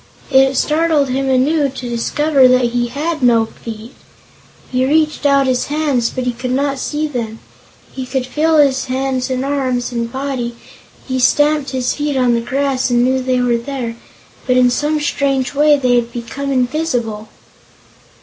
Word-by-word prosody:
It 270 0 +4
startled 310 -2 +1
him 270 +1 -1
anew 280 +3 +2
to 255 -1 -7
discover 270 +4 +2
that 250 -1 +3
he 240 0 0
had 300 +5 -3
no 235 -3 +4
feet. 225 +1 -10 0.8
He 255 0 +1
reached 305 +1 +1
out 275 -1 +3
his 255 -1 0
hands, 285 -5 0
but 255 - -4
he 250 - 0
could 240 +2 -5
not 275 0 -1
see 300 +3 -2
them. 235 -6 -4 0.5
He 260 -1 -6
could 260 0 -2
feel 310 +5 +1
his 275 -3 +3
hands 260 0 -2
and 260 0 -2
arms 255 -3 -1
and 235 -1 -3
body; 260 -3 -3 0.5
he 260 -1 -1
stamped 290 +2 +2
his 255 -1 -1
feet 295 -2 -2
on 250 -2 +3
the 235 - +1
grass 265 +2 -1
and 240 0 +2
knew 260 +1 +1
they 255 -1 0
were 240 -1 +2
there, 240 -2 -5 0.5
but 250 -1 +3
in 250 -1 +4
some 300 +4 0
strange 275 -3 -1
way 295 +1 +4
they 250 -3 +2
had 235 0 -1
become 245 +4 -5
invisible. 245 -5 -1
260 Hz, 170 wpm, -17 LUFS, 245-285 Hz, 0.8 s, It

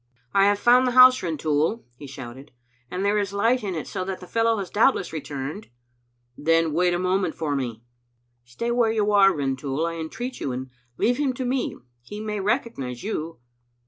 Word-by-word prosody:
" - - -41
I 195 0 +5
have 205 0 +3
found 245 +4 +5
the 250 - 0
house, 255 0 +8
Rintoul," 160 +5 -1
he 140 +3 -10
shouted, 135 +1 -10 0.4
"and 185 +2 -3
there 205 +1 +2
is 200 -2 -2
a - - -4
light 235 +4 +2
in 190 -3 -3
it, 155 - -4
so 185 - -4
that 190 -1 -4
the 180 - -10
fellow 225 +3 +1
has 195 -3 -5
doubtless 205 -5 +2
returned. 150 +5 -6 0.4
" - - -45 0.3
"Then 165 0 +2
wait 175 +2 +2
a - - 0
moment 185 -1 0
for 150 -3 -2
me." 120 -4 -4 0.6
"Stay 120 - -4
where 235 -2 +2
you 210 -2 +1
are, 195 -1 +6
Rintoul, 140 -1 -2
I 165 0 -3
entreat 240 +11 -5
you, 135 - -3
and 130 +1 -6 0.3
leave 245 +1 +2
him 275 -3 +1
to 255 +1 -4
me. 255 +1 -1 0.2
He 205 - -9
may 210 -1 -3
recognize 195 - -2
you." 165 - -4
185 Hz, 205 wpm, -24 LUFS, 145-225 Hz, 0.6 s, house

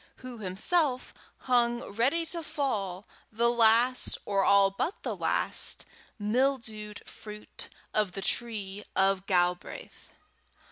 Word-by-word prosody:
who 255 -2 -9
himself 250 - 0 0.3
hung 240 -1 +2
ready 265 +11 +2
to 335 +1 -2
fall, 210 - -2 0.3
the 235 +2 +2
last, 235 +2 +3
or 195 -1 +1
all 200 0 +5
but 335 - -3
the - - -2
last, - - +1 0.3
mildewed 220 -2 -1
fruit 210 0 -9 0.2
of 210 -4 +1
the 195 - -5
tree 210 -4 -2
of 195 0 +2
Galbraith! 180 -1 -1
220 Hz, 110 wpm, -29 LUFS, 195-250 Hz, 0.3 s, all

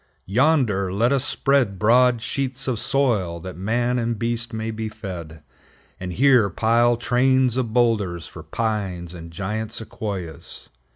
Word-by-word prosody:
Yonder 110 - +2
let 115 +6 +2
us 135 -2 +1
spread 135 -8 +1
broad 120 +2 +4
sheets 130 +2 -3
of 125 -4 -1
soil, 120 -10 0
that 95 +2 -8
man 120 +6 0
and 115 -1 -1
beast 115 +1 -2
may 110 0 -3
be 110 0 -4
fed; 85 -7 -8 0.6
and 90 -1 -5
here 125 -2 +4
pile 115 +4 +2
trains 125 +1 +2
of 125 -4 -1
boulders 105 -8 +1
for 85 - -10
pines 95 -1 -3
and 85 -1 -9
giant 105 +6 -4
Sequoias. 95 -8 -6
110 Hz, 140 wpm, -23 LUFS, 95-125 Hz, 0.6 s, broad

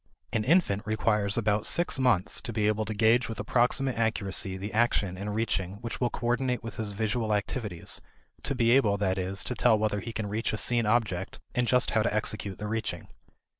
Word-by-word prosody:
An 110 - +1
infant 135 - +3
requires 105 -1 +1
about 105 -2 +1
six 170 -5 +2
months 125 -8 +2
to - - -5
be 110 -2 0
able 105 +1 +1
to 110 - -3
gauge 115 +3 +3
with 110 +1 -6
approximate 125 0 +1
accuracy 100 -3 0
the 100 +2 -6
action 105 -5 +1
in 100 +3 -5
reaching 100 -4 -1
which 115 +1 -5
will 120 - +2
coordinate 125 +1 -1
with 115 -2 -7
his 105 -2 -3
visual 110 +1 0
activities; 105 -3 -3 0.4
to 140 - -2
be 115 -2 +3
able, 110 -6 +4
that 95 -2 0
is, 95 +1 -1
to - - -3
tell 120 -2 +3
whether 105 -1 0
he 115 +4 -6
can 110 -1 -3
reach 105 +3 -2
a - - -1
seen 120 0 +2
object 105 -5 0
and 125 -1 0
just 125 0 +4
how 110 - +2
to 115 - +1
execute 105 -2 -2
the 105 - -6
reaching. 110 +1 -3
110 Hz, 205 wpm, -28 LUFS, 100-120 Hz, 0.4 s, able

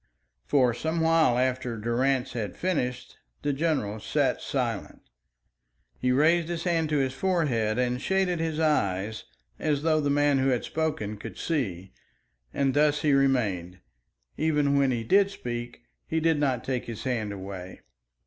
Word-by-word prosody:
For 130 -4 +3
some 160 +7 -2
while 160 -6 +3
after 125 -2 -1
Durrance 125 +4 0
had 105 -6 -4
finished, 125 -9 -2 0.2
the 145 - +1
general 135 -9 -1
sat - - 0
silent. - - -3 1.0
He 125 - +1
raised 160 +5 +3
his 170 -1 -3
hand 165 -3 +1
to 150 - +1
his 135 -2 0
forehead 130 - 0
and 125 0 0
shaded 190 -1 +1
his 160 -1 -2
eyes 110 -9 0 0.3
as 145 -1 0
though 155 -1 +3
the 145 - 0
man 145 -1 +3
who 130 - +2
had 125 -2 +1
spoken 150 -10 -2
could - - -9
see, 95 - -2 0.6
and 135 -1 +1
thus 150 0 +2
he 150 -2 +3
remained. 105 -10 +1 0.6
Even 150 -2 +2
when 140 -1 +3
he 120 -3 -1
did 195 - +4
speak, 120 -9 -6 0.2
he 160 - 0
did 160 -1 +2
not 130 -5 0
take 130 -2 -2
his 115 -3 -6
hand 115 -5 -1
away. 95 -2 -8
135 Hz, 155 wpm, -27 LUFS, 120-155 Hz, 1.0 s, did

